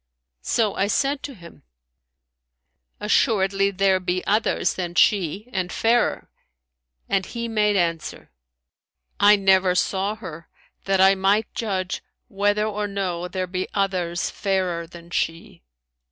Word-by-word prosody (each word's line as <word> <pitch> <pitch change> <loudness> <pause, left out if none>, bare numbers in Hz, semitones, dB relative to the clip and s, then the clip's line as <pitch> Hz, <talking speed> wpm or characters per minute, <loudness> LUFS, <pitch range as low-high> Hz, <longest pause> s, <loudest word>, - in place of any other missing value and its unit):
So 215 - +1
I 195 - 0
said 275 +7 0
to 275 - -7
him, 170 -4 -14 1.4
Assuredly 200 -2 +2
there 195 -1 +2
be 180 0 -2
others 210 +2 +1
than 175 -2 -5
she 200 +2 +2
and 185 -2 -2
fairer;' 235 +1 +1 0.8
and 195 -1 +1
he 235 +3 -5
made 210 -2 +1
answer, 170 -3 -2 0.9
I 205 +1 +7
never 190 -2 +3
saw 195 +3 0
her, 170 -7 -10 0.4
that 195 -1 +1
I 190 +1 +7
might 195 +3 +1
judge 190 -5 -3 0.3
whether 205 +1 +1
or 210 -1 -2
no 185 -3 -3
there 185 0 -3
be 185 +1 -3
others 180 -3 -1
fairer 185 -4 -1
than 170 0 -14
she.' 165 - -3
195 Hz, 125 wpm, -23 LUFS, 180-210 Hz, 1.4 s, I